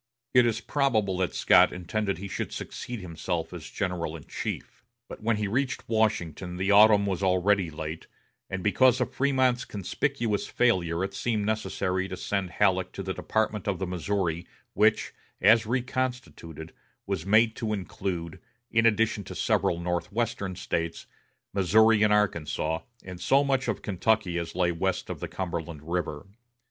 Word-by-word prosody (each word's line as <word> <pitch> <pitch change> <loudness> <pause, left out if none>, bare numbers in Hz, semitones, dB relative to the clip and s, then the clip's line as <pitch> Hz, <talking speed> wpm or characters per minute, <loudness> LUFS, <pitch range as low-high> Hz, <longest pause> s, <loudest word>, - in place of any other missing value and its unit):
It 125 -2 +6
is 115 0 -1
probable 110 -10 +1
that 95 - -1
Scott - - +5
intended 100 +2 -2
he 100 +3 -6
should - - -4
succeed 120 -3 -6
himself 85 -1 -4
as - - -8
general 90 -4 -3
in 75 - -13
chief; - - -6 0.2
but - - -9
when 115 0 +1
he 105 -1 -1
reached 130 +5 -1
Washington 90 -6 0
the 95 +2 +1
autumn 105 0 +7
was 95 -2 -2
already 95 0 +2
late, 80 +1 -6 0.4
and 95 -1 -4
because 125 +6 +4
of 125 - -2
Frémont's 130 -2 +2
conspicuous 110 +2 -2
failure 90 -8 +1
it 100 0 -3
seemed 105 +1 -1
necessary 95 -3 -1
to - - -6
send 100 -3 -2
Halleck 95 -1 +1
to 95 - -5
the 95 0 -3
Department 110 0 -1
of 100 -2 0
the 95 - -2
Missouri, 90 -1 -2 0.3
which, - - +2 0.3
as 110 +1 +5
reconstituted, 125 - -3 0.3
was 95 -5 -2
made 110 +2 +4
to 110 -3 -2
include, 90 -4 -4 0.3
in 115 0 +4
addition 110 -1 +1
to - - -8
several 85 - +1
northwestern 100 +3 -2
States, 85 -1 -3 0.5
Missouri 105 +3 +4
and 105 0 +4
Arkansas, 85 -6 +1 0.2
and 90 -1 -9
so 140 +7 +4
much 135 -2 0
of 115 - -2
Kentucky 100 -2 +1
as 85 0 -6
lay 90 -1 +2
west 95 +2 -2
of - - -6
the - - -4
Cumberland 85 -4 -5
River. 85 0 -3
100 Hz, 155 wpm, -27 LUFS, 90-110 Hz, 0.5 s, autumn